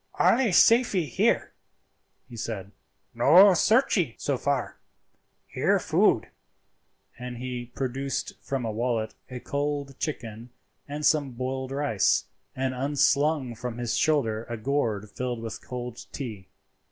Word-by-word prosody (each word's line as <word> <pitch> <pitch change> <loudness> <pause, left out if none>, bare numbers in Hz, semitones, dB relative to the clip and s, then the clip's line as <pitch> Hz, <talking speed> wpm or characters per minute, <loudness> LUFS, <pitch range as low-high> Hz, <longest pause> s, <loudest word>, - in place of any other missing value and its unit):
"Allee 250 -1 +4
safee 225 -2 +5
here," 125 - +1 0.7
he 120 - -11
said, 105 -3 -5 0.4
"no 175 +12 +7
searchee 200 - +2
so 140 - -1
far; 135 0 -2 0.7
here - - +1
food;" - - +2 0.9
and 125 0 -6
he 125 -1 -5
produced 135 +1 -3
from 135 -3 -3
a 110 - -2
wallet 115 -1 -1 0.2
a 125 -1 -6
cold 140 0 -3
chicken 115 -6 -5 0.4
and 145 +1 -4
some 145 -4 +2
boiled 130 +2 -4
rice, 135 -8 +1 0.3
and 130 0 -1
unslung 140 0 +1
from 120 +1 -6
his 120 -2 -2
shoulder 115 -8 +1
a 120 - -3
gourd 110 -4 -1
filled 125 -2 -3
with 115 -2 -6
cold 125 -1 -7
tea. 110 -9 -7
130 Hz, 125 wpm, -26 LUFS, 120-145 Hz, 0.9 s, no